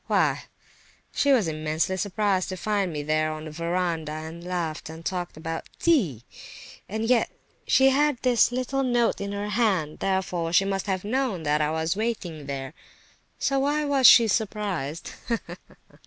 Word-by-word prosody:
"Why, - - +1 0.7
she 285 - +2
was 235 -10 +4
immensely 155 +3 -1
surprised 195 0 0
to 185 - -4
find 200 -1 0
me 150 -2 -4
there 155 +1 +1
on 155 0 -6
the 155 - -7
verandah, 170 -1 -2
and 160 +2 -7
laughed 175 -4 -3
and 160 +1 -10
talked 180 -4 -3
about 165 +1 -5
tea! 190 - +2 0.7
And 220 +2 -2
yet 245 0 +3 0.4
she 265 0 +5
had 290 0 +2
this 245 -2 +4
little 255 +2 -1
note 240 -4 +1
in 200 0 -3
her 205 +1 -3
hand, 195 -8 0
therefore 180 -3 -1
she 195 +2 +5
must 195 0 -2
have 190 -2 -1
known 235 -6 -1
that 150 0 +1
I 150 - +1
was 160 +1 -1
sitting 190 -8 -3
there. 135 0 -5 0.6
So 275 0 +1
why 295 +2 +1
was 275 -3 +5
she 230 -2 +8
surprised? 195 -8 -2
185 Hz, 160 wpm, -25 LUFS, 160-230 Hz, 0.7 s, she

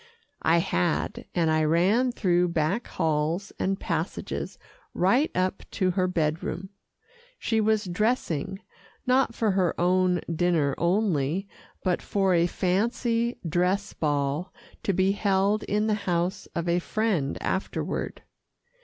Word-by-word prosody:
I 165 +1 +4
had, 85 - 0
and 165 -3 +2
I 155 0 +3
ran 190 +11 +3
through 180 -6 +2
back 170 +7 0
halls 160 +4 -1
and 195 +1 0
passages - - -3 0.4
right 240 - +3
up 185 +1 0
to 185 -3 +1
her 185 0 +1
bed 160 -3 0
room. 190 +2 -4 0.7
She 225 -1 0
was 215 -1 +2
dressing, 195 - -1 0.4
not 255 -2 +2
for 220 -3 +1
her 185 -3 +1
own 180 0 +3
dinner 165 -5 +2
only, 175 -1 +1 0.4
but 180 -2 +1
for 195 -2 +1
a 170 0 +4
fancy 230 +6 0
dress 180 +5 0
ball 145 +2 -1 0.3
to - - 0
be 190 +1 +2
held 200 +1 +2
in 210 +1 +1
the 220 - +2 0.2
house 175 +3 -1
of 170 0 -2
a 170 +1 +2
friend 185 -8 -1
afterward. 190 - -3
185 Hz, 130 wpm, -26 LUFS, 170-205 Hz, 0.7 s, I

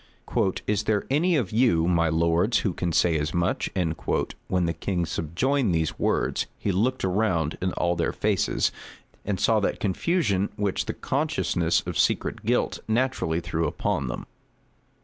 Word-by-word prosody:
"Is 105 0 0
there 105 -2 +1
any 170 +5 +3
of 120 -11 0
you, 110 -8 +3
my 85 -2 +3
lords, 85 +7 +2
who 95 - +1
can 90 0 -2
say 80 0 +3
as 75 +2 -2
much?" 85 +1 0 0.8
When 90 -1 +1
the 85 - 0
king 90 -1 -2
subjoined 90 - 0
these 80 -1 -1
words, - - 0
he 100 - -1
looked 120 +8 0
round 90 -5 +1
in 90 0 0
all 85 0 0
their 85 - 0
faces, 105 -3 +1 0.5
and 100 -2 -1
saw 110 +1 +3
that 100 - -1
confusion 105 - +1
which 100 -2 -1
the - - -3
consciousness 135 - 0
of - - -3
secret - - +1
guilt - - 0
naturally 110 -8 0
threw 80 -1 -1
upon 90 -3 -1
them. 60 - -5
95 Hz, 155 wpm, -25 LUFS, 85-110 Hz, 0.8 s, any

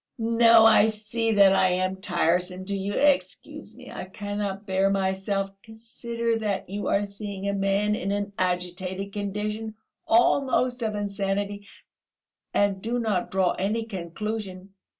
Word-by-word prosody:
"No, 230 -1 +5
I 220 -1 +6
see 220 +1 -2
that 200 -2 +6
I 185 -1 +4
am 185 +1 -1
tiresome 180 0 0
to 200 +1 -2
you! 195 +1 -3
Excuse 290 -1 0
me, - - -12
I - - -6
cannot 205 +1 -4
bear 195 0 +2
myself; 195 0 -1
consider 230 +1 -4
that 205 -3 -2
you 205 +2 -4
are 205 +1 +2
seeing 200 -1 -6
a 200 - 0
man 200 +1 +1
in 200 -2 -2
an 205 0 -2
agitated 185 +2 -2
condition, 210 +2 -4 0.3
almost 250 +1 +3
of 220 -2 -1
insanity, 200 0 -3 0.8
and 200 -1 +1
do 235 +3 -1
not 215 -6 -1
draw 190 -2 +2
any 215 +4 -1
conclusion...." 195 0 -5
200 Hz, 140 wpm, -26 LUFS, 190-220 Hz, 0.8 s, I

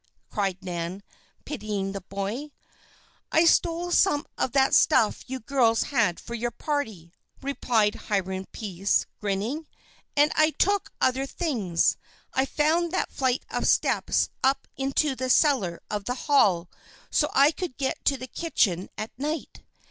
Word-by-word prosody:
cried 195 -4 -1
Nan, 175 +2 -4 0.4
pitying 210 -7 -3
the 195 0 -5
boy. 200 +10 -4 0.8
"I 320 +2 +5
stole 340 +1 +2
some 320 -5 +3
of 255 - -1
that 270 -1 +3
stuff 225 -5 +4
you 260 0 -3
girls 235 -2 +2
had 210 -9 +2
for 235 - -9
your 235 +1 -1
party," 220 - -4 0.3
replied 230 -6 +1 0.2
Hiram 190 -2 -1
Pease, 195 -2 0
grinning. 215 +10 -2 0.5
"And 295 +1 +5
I 310 0 +3
took 405 0 +1
other 265 +1 +1
things. 225 - 0 0.4
I 265 - +2
found 320 +4 +1
that - - -1
flight 260 -1 0
of - - -1
steps - - +2
up 270 +1 +2
into 275 +2 0
the 255 0 -3
cellar 250 - +3
of 205 -1 -3
the 250 - -2
Hall. 195 - +4 0.4
So 300 - +2
I 280 +3 +6
could 335 -5 -6
get 270 -1 -2
to 275 - +3
the 255 - -6
kitchen 225 - 0
at 215 - -4
night. 305 +3 -4
255 Hz, 145 wpm, -26 LUFS, 200-290 Hz, 0.8 s, I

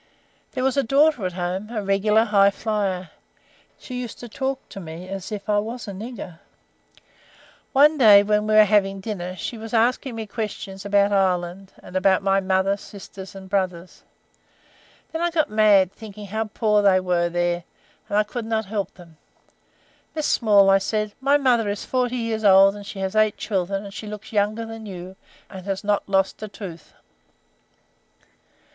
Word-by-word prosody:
There 255 - -2
was 265 +1 +1
a 275 - +3
daughter 275 -4 +3
at 180 - -7
home, 180 +4 -3
a 220 -3 -3
regular 205 +3 +3
high 200 -3 +4
flier. 195 -5 -2 0.7
She 250 -1 -6
used 240 - -7
to 240 - -7
talk 265 +3 -4
to - - -9
me 170 0 -8
as 195 +1 -6
if 205 -1 -6
I 210 -1 +2
was 230 +3 -5
a - - -4
nigger. 195 -4 -8 1.3
One 295 +2 +5
day 205 -4 +8
when 210 +1 +1
we 215 - +2
were 215 - +9
having 195 -2 +2
dinner, 185 -3 -5
she 230 +4 -6
was 225 +1 -5
asking 240 +2 +1
me 225 -1 -4
questions 205 -3 -6
about 200 0 +3
Ireland, 185 0 0
and 180 - -12
about 190 0 +3
my 195 0 +3
mother, 190 +1 +1
sisters, 195 -1 -11
and 190 -1 -10
brothers. 185 -2 -3 1.1
Then 325 - -3
I 345 - +2
got 315 -7 0
mad, 205 -4 +4
thinking 210 -2 -10
how 220 +3 -2
poor 210 0 +1
they 195 -2 +4
were, 180 -2 +1
and 175 +3 -4
I 210 - +4
could 225 +2 -6
not 220 -1 -1
help 200 0 -4
them. 170 -3 -16 1.0
'Miss 310 -1 -1
Small,' 205 -4 +4
I 195 - +5
said, 215 +1 -2
'my 280 +2 +4
mother 245 -6 +2
is 205 - -4
forty 250 -1 -1
years 225 -2 -2
old, 195 0 +6
and 205 -1 -10
she 200 - -8
has 190 +2 -3
eight 215 -1 +3
children, 195 -1 -2
and 200 -1 -9
she 215 - -7
looks 210 +1 -9
younger 215 +2 0
than 225 -1 -8
you 195 - -7
do, 180 +2 -9 0.4
and 185 -1 -9
has 195 0 -3
not 205 -1 0
lost 195 +1 +1
a 215 - -4
tooth.' 195 -5 -10
205 Hz, 180 wpm, -23 LUFS, 190-220 Hz, 1.3 s, were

